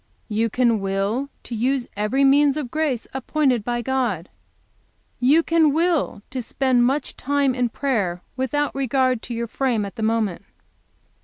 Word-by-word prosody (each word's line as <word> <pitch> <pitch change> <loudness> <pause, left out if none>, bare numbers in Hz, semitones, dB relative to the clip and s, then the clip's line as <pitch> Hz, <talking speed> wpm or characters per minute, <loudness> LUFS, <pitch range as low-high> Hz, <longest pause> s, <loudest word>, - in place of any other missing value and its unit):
"You 225 +2 +1
can 235 -1 +2
will 195 +7 -1
to - - -8
use 250 +3 0
every 210 +7 +1
means 280 +1 +4
of 270 -6 -4
grace 305 -7 -1
appointed 265 -3 +1
by 240 +1 -2
God. 235 -10 -1 0.9
"You 290 +7 +4
can 325 -3 +3
will 325 - 0
to 260 -1 -3
spend 245 0 +2
much 275 +2 -1
time 280 -1 +1
in 250 -1 0
prayer, 205 -10 -1
without 290 +3 -1
regard 260 -2 +1
to 240 - -6
your 235 0 -2
frame 235 -2 -1
at 195 - -9
the - - -4
moment. 220 -4 0
255 Hz, 155 wpm, -22 LUFS, 225-275 Hz, 0.9 s, means